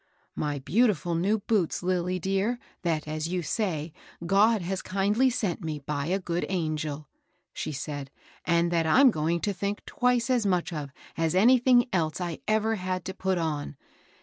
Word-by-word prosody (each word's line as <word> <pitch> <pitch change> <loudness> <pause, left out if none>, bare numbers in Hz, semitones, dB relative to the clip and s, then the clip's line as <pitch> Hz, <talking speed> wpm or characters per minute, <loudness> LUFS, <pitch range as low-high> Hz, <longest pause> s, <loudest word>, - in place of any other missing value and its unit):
^ - - -40 0.3
My 145 -2 -2
beautifiil 175 - +1
new 200 +5 +2
boots, 195 -6 0
Lilly 180 0 0
dear, 195 +6 0 0.2
that, 160 -3 -1
as 155 +1 -3
you 180 0 -2
say, 160 -3 -2 0.3
God 205 +3 +4
has 185 +2 -2
kindly 205 +7 +2
sent 205 -8 -2
me, 155 -2 -3
by 145 0 -3
a 185 +3 +1
good 175 -2 -2
angel," 155 -4 -2 0.5
she - - -4
said, 145 -1 -5 0.3
"and 170 0 +2
that 165 -2 +1
I'm 260 - +6
going 165 0 0
to 205 - 0
think 200 +2 -3
twice 250 0 +1
as 245 -3 +2
much 180 -3 0
of 150 -3 -4 0.3
as 165 +1 +1
of 185 - +5
anything 245 +1 +5
else 160 -3 0
I 175 -3 -4
ever 220 +1 +1
had 185 -1 -3
to 190 - -4
put 190 -1 -1
on. 150 -3 -2
180 Hz, 175 wpm, -27 LUFS, 160-205 Hz, 0.5 s, I'm